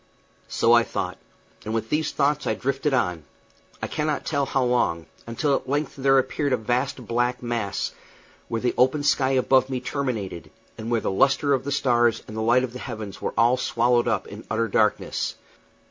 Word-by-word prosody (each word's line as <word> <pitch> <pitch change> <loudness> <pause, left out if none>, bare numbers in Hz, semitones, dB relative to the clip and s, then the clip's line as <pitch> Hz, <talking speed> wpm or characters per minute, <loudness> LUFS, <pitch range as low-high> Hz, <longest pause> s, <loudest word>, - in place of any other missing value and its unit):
So 115 +1 +3
I 120 - +7
thought; - - -4 0.4
and 110 +1 -3
with 115 0 -3
these 155 0 +1
thoughts 145 +1 +1
I - - +1
drifted 140 +2 -1
on, 90 - 0 0.6
I - - 0
cannot 150 -1 -2
tell 140 -3 0
how 135 - +1
long, 120 -10 +1 0.2
until 140 +5 0
at 135 - -2
length 145 +1 -1
there 135 0 +3
appeared 140 +1 0
a - - +3
vast 125 +3 -2
black 120 +2 -1
mass, 115 -4 -2 0.6
where 115 -1 -2
the 125 - +1
open 130 +4 +3
sky 135 -2 +2
above 130 0 +3
me 130 -1 -2
terminated, 125 - -4 0.3
and 110 +1 -6
where 115 -2 +1
the - - -1
lustre 135 +7 +3
of 135 -1 0
the 140 - -2
stars 120 -4 +2
and 110 - -8
the 110 - -2
light 120 +3 +3
of 125 -2 -4
the 125 - -7
heavens 105 -5 -7
were - - -3
all 120 +2 +4
swallowed 120 0 +2
up 110 -5 0
in 105 +2 -9
utter 115 +1 0
darkness. 105 -1 0
125 Hz, 190 wpm, -24 LUFS, 115-135 Hz, 0.6 s, I